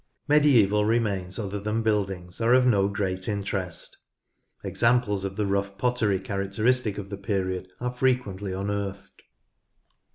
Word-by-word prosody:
Medieval 125 Hz, -9 st, +4 dB
remains 100 Hz, -5 st, 0 dB
other 100 Hz, -2 st, -3 dB
than 105 Hz, +3 st, -1 dB
buildings 95 Hz, -4 st, -1 dB
are 120 Hz, +2 st, +5 dB
of 130 Hz, 0 st, +4 dB
no 100 Hz, -6 st, +4 dB
great 95 Hz, -2 st, -2 dB
interest. 100 Hz, -4 st, -4 dB, 0.7 s
Examples 115 Hz, -5 st, +1 dB
of 95 Hz, 0 st, -4 dB
the 105 Hz, -, 0 dB
rough 100 Hz, 0 st, -1 dB
pottery 110 Hz, -4 st, +1 dB
characteristic 100 Hz, +4 st, 0 dB
of 100 Hz, -1 st, -7 dB
the 100 Hz, -, -4 dB
period 95 Hz, -2 st, -2 dB
are 125 Hz, 0 st, -3 dB
frequently 125 Hz, -7 st, 0 dB
unearthed. 100 Hz, 0 st, -4 dB
100 Hz, 130 wpm, -26 LUFS, 95-115 Hz, 0.7 s, are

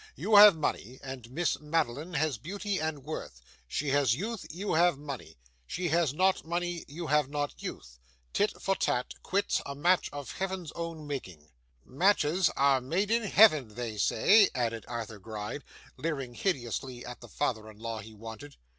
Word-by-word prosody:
You 215 Hz, 0 st, +1 dB
have 205 Hz, -3 st, +10 dB
money, 130 Hz, -5 st, -3 dB
and 130 Hz, -3 st, -7 dB
Miss 165 Hz, +7 st, 0 dB
Madeline 150 Hz, +1 st, -1 dB
has 150 Hz, -6 st, 0 dB
beauty 200 Hz, -, -3 dB
and 155 Hz, -3 st, -3 dB
worth. 150 Hz, -, -6 dB, 0.3 s
She 145 Hz, -, -2 dB
has 135 Hz, -5 st, +3 dB
youth, 215 Hz, -, -4 dB
you 190 Hz, +6 st, -3 dB
have 170 Hz, -1 st, +4 dB
money. 140 Hz, -, -8 dB, 0.3 s
She 175 Hz, -1 st, -2 dB
has 165 Hz, -3 st, +2 dB
not 185 Hz, +5 st, +2 dB
money, 175 Hz, +1 st, -2 dB
you 165 Hz, +4 st, -6 dB
have 150 Hz, -3 st, +2 dB
not 145 Hz, 0 st, -3 dB
youth. -, -, -7 dB, 0.3 s
Tit 205 Hz, +1 st, +1 dB
for 195 Hz, -, 0 dB
tat, 125 Hz, -8 st, -1 dB
quits, 200 Hz, +2 st, 0 dB
a 140 Hz, -, -6 dB
match 175 Hz, +6 st, +2 dB
of 145 Hz, -2 st, -6 dB
Heaven's 190 Hz, -4 st, -4 dB
own 165 Hz, -2 st, -6 dB
making!' 90 Hz, -, -6 dB, 0.4 s
'Matches 170 Hz, +2 st, +3 dB
are 140 Hz, -2 st, +4 dB
made 180 Hz, -, -1 dB
in 230 Hz, +1 st, +3 dB
Heaven, 155 Hz, -, +5 dB
they 115 Hz, -4 st, -4 dB
say,' 200 Hz, -, +5 dB
added 115 Hz, -3 st, -1 dB
Arthur 115 Hz, -3 st, -5 dB
Gride, 110 Hz, +6 st, -6 dB, 0.3 s
leering 140 Hz, -6 st, -3 dB
hideously 125 Hz, -, -2 dB
at 125 Hz, 0 st, -8 dB
the -, -, -11 dB
father 110 Hz, -6 st, -2 dB
in 105 Hz, -, -14 dB
law 115 Hz, 0 st, -4 dB
he 110 Hz, +1 st, -11 dB
wanted. 115 Hz, +7 st, -9 dB
145 Hz, 170 wpm, -30 LUFS, 120-175 Hz, 0.4 s, have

